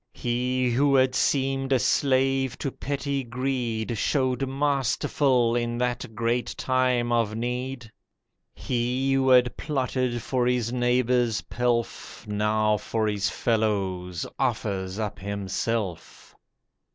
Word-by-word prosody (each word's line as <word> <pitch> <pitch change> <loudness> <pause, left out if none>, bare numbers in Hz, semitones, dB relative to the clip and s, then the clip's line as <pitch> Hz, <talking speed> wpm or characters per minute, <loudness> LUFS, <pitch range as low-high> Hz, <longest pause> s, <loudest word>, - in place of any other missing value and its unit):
He 125 +1 0
who 140 +3 +3
had 130 -1 +4
seemed 135 0 +1
a 135 - +5
slave 130 +1 +1
to 140 - -3
petty 140 0 -3
greed 120 -3 -2
Showed 130 -1 +1
masterful 135 -3 +1
in 120 0 -1
that 125 -2 -2
great 120 +1 -1
time 125 -2 +1
of 115 -3 +1
need. 125 0 -4 0.6
He 125 +2 -1
who 135 0 +2
had 125 -1 +5
plotted 130 -4 -1
for 125 -2 0
his 125 -1 0
neighbour's 125 -2 +2
pelf, 120 -3 -2
Now 105 +1 +1
for 110 +2 -2
his 100 -2 0
fellows 95 -6 -1
offers 95 -2 -1
up 105 -2 -3
himself. 100 -1 -4
120 Hz, 115 wpm, -26 LUFS, 110-130 Hz, 0.6 s, a